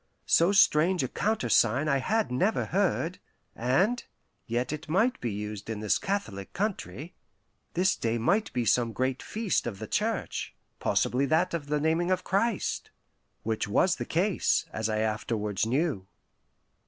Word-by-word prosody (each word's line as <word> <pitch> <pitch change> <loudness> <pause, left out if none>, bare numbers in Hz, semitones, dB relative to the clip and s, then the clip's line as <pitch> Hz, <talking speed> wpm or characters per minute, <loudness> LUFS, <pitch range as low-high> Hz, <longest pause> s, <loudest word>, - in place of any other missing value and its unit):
So 170 +3 +4
strange 180 -4 +4
a - - 0
countersign 130 - +2
I 140 -2 +2
had 220 - 0
never 185 - +1
heard, 185 -2 0 0.4
and 185 - +1 0.4
yet 120 +4 -1
it 155 +1 -7
might 220 +10 +2
be 120 - -2
used 105 +1 -6
in 110 -2 -3
this 105 -1 +1
Catholic 115 - -3
country. 185 -5 -3 0.6
This 185 +2 +3
day 115 0 -1
might 200 - +1
be 120 -2 -1
some 115 +1 +2
great 130 +3 -1
feast 215 - -1
of 105 -5 -4
the - - -6
Church - - -2 0.2
possibly 135 +3 +1
that 170 +5 +2
of 155 -4 -3
the 150 0 0
naming 165 +3 +1
of 185 -1 +1
Christ 200 +3 0 0.5
(which 110 -1 -1
was 170 - +2
the - - -4
case, 185 +3 +1
as 110 0 -1
I 110 0 0
afterwards 105 -1 -1
knew). 130 - 0
150 Hz, 155 wpm, -28 LUFS, 115-185 Hz, 0.6 s, So